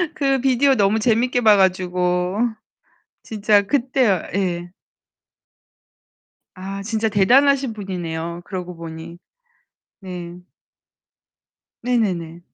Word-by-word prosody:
그 275 -4 +1
비디오 270 +1 +3
너무 210 0 +2
재밌게 245 +2 +1
봐가지고 180 -2 +2 0.9
진짜 210 -1 +2
그때요 250 -4 +1
예. 175 -3 -2 1.9
아, 195 +1 -6
진짜 220 +1 -1
대단하신 260 +6 +3
분이네요. 175 -4 -5
그러고 180 -2 -6
보니. 165 +1 -9 0.8
네. 180 -2 -8 1.4
네네네. 185 -9 -1
195 Hz, 185 characters per minute, -21 LUFS, 180-235 Hz, 1.9 s, 비디오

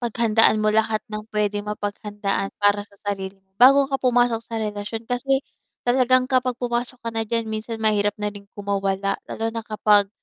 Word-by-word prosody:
paghandaan 230 -2 +3
mo 215 0 +2
lahat 220 0 +1
ng 215 +1 -5
pwedeng 210 -1 -1
mapaghandaan 205 -1 -3
para 205 0 +3
sa 200 - -23
sarili 195 -1 -4
mo, 190 0 -38
bago 275 +3 +8
ka 270 -1 -2
pumasok 245 -2 +2
sa 230 0 -7
relasyon. 215 +1 -4
Kasi 265 +3 0 0.4
talagang 255 +1 +3
kapag 255 -1 0
pumasok 245 +1 -2
ka 230 - -2
na 225 0 -1
diyan 230 0 0
minsan 220 +1 -4
mahirap 205 -1 +2
na 210 0 -3
rin 200 -1 -13
kumawala, 200 -1 -1
lalo 225 - -4
na 230 - -3
kapag 210 -2 +3
215 Hz, 175 wpm, -23 LUFS, 205-240 Hz, 0.4 s, bago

